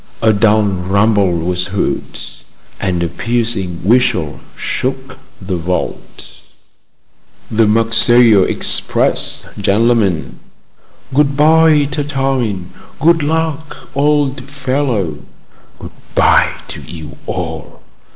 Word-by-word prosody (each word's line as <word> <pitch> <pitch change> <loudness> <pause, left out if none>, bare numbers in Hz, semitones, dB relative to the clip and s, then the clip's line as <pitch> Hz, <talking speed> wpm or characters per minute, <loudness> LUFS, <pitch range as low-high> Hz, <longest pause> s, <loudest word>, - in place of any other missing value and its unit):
A 110 -1 +4
dull 105 +1 +3
rumble 100 +1 +1
was 90 +2 -1
heard, 100 0 -3 0.6
and 90 -3 -1
a - - 0
piercing 110 -5 -3
whistle 110 - +1 0.2
shook 130 0 -4 0.2
the 95 -2 -4
vault. 90 +2 -5 1.1
"The 110 0 +3
Marseilles 115 -1 +5
express, - - +1
gen'lemen!" 100 -4 +1 0.7
"Good 140 0 +2
bye, 155 -1 +5
Tartarin! 135 - -2 0.3
Good 165 +3 +3
luck, 160 0 -3
old 140 -2 +1
fellow!" 130 - -2 0.6
"Good - - -10 0.2
bye - - +4 0.2
to - - -7
you 80 -3 -10
all!" - - -6
115 Hz, 95 wpm, -15 LUFS, 95-140 Hz, 1.1 s, Marseilles